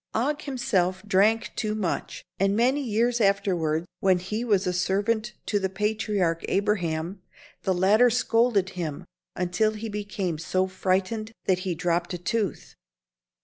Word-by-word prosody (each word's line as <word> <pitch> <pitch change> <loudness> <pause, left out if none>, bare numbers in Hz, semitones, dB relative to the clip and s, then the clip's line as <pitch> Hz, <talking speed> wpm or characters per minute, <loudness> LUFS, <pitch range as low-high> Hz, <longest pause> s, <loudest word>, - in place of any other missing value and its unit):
Og 290 +6 0
himself 240 -10 0
often 210 - -18
drank 215 +4 +3
too 215 -1 -1
much, 195 -6 -3 0.2
and 195 +1 +2
many 255 +6 +2
years 235 0 +1
afterward, 175 -6 +1
when 190 -2 +4
he 210 +6 -3
was 205 -5 +2
a 180 - 0
servant 210 +5 0
to 205 - +1
the 190 -1 -1
patriarch 205 -4 0
Abraham, 185 -3 -1 0.4
the 190 - +1
latter 210 +7 +5
scolded 230 -4 +2
him 160 -5 -5 0.3
until 180 +5 +1
he 220 +1 -5
became 205 -5 -3
so 185 +3 0
frightened 190 +4 -1
that 185 -1 +2
he 185 -2 -2
dropped 175 +2 -1
a - - -4
tooth. 195 0 -2
200 Hz, 145 wpm, -26 LUFS, 180-220 Hz, 0.4 s, latter